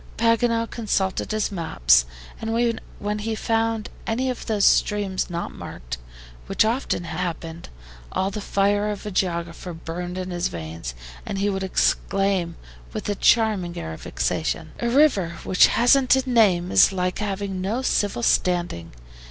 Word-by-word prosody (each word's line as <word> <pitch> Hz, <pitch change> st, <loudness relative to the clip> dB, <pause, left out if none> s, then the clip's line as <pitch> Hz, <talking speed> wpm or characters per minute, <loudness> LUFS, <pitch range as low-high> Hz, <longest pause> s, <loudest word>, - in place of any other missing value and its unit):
Paganel 230 Hz, 0 st, +2 dB
consulted 200 Hz, -5 st, -1 dB
his 215 Hz, 0 st, 0 dB
maps, 65 Hz, -, +3 dB, 0.4 s
and 230 Hz, +1 st, 0 dB, 0.2 s
when 210 Hz, +1 st, -3 dB
he 220 Hz, +1 st, -2 dB
found 225 Hz, -1 st, 0 dB, 0.2 s
any 255 Hz, +3 st, 0 dB
of 250 Hz, -, -7 dB
those 210 Hz, -3 st, +2 dB
streams 200 Hz, -3 st, +2 dB
not 170 Hz, 0 st, -4 dB
marked, -, -, -7 dB, 0.5 s
which -, -, +2 dB
often 230 Hz, -5 st, -1 dB
happened, 170 Hz, -1 st, -5 dB, 0.4 s
all 190 Hz, +1 st, 0 dB
the 210 Hz, -, -5 dB
fire 205 Hz, +1 st, +1 dB
of 210 Hz, -1 st, -5 dB
a 210 Hz, -, -4 dB
geographer 170 Hz, -1 st, -2 dB
burned 175 Hz, +2 st, -5 dB
in 185 Hz, 0 st, -4 dB
his 175 Hz, 0 st, -1 dB
veins, 80 Hz, -7 st, -6 dB, 0.3 s
and 195 Hz, -, -4 dB
he 200 Hz, +1 st, +1 dB
would 190 Hz, 0 st, -3 dB
exclaim, 190 Hz, -2 st, +1 dB, 0.4 s
with 215 Hz, -, -4 dB
a -, -, +2 dB
charming 205 Hz, -5 st, +2 dB
air 80 Hz, -1 st, -5 dB
of 80 Hz, -, -10 dB
vexation: -, -, -2 dB
"A 235 Hz, -, 0 dB
river 235 Hz, -, +3 dB
which 185 Hz, -, +5 dB
hasn't 255 Hz, +2 st, +4 dB
a 265 Hz, 0 st, -1 dB
name 195 Hz, -8 st, +3 dB
is -, -, +6 dB
like 180 Hz, -1 st, -1 dB
having 200 Hz, -2 st, -3 dB
no 220 Hz, +7 st, -1 dB
civil 205 Hz, -, 0 dB
standing. 175 Hz, -, +1 dB
195 Hz, 150 wpm, -23 LUFS, 175-225 Hz, 0.5 s, is